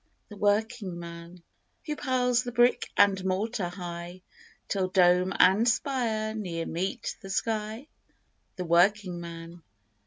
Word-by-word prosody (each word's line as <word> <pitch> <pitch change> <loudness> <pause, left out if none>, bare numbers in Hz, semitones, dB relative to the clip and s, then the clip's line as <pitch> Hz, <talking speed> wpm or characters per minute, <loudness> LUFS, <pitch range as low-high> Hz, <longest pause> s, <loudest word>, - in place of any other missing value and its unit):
The 210 - -10
working 205 -2 0
man. 170 0 -10 0.4
Who 300 -2 -3
piles 250 -3 +1
the 245 -1 -5
brick 240 +1 +3
and 195 -2 +4
mortar, 190 0 -1
high, 175 0 -7 0.4
Till 190 -2 0
dome 180 0 +4
and 200 +6 +5
spire 225 -3 -1
near 175 -6 -4
meet 190 +7 -3
the 195 - -10
sky? 220 +4 -2 0.7
The 180 - -4
working 180 +2 +3
man. 170 0 -9
195 Hz, 125 wpm, -28 LUFS, 175-225 Hz, 0.7 s, and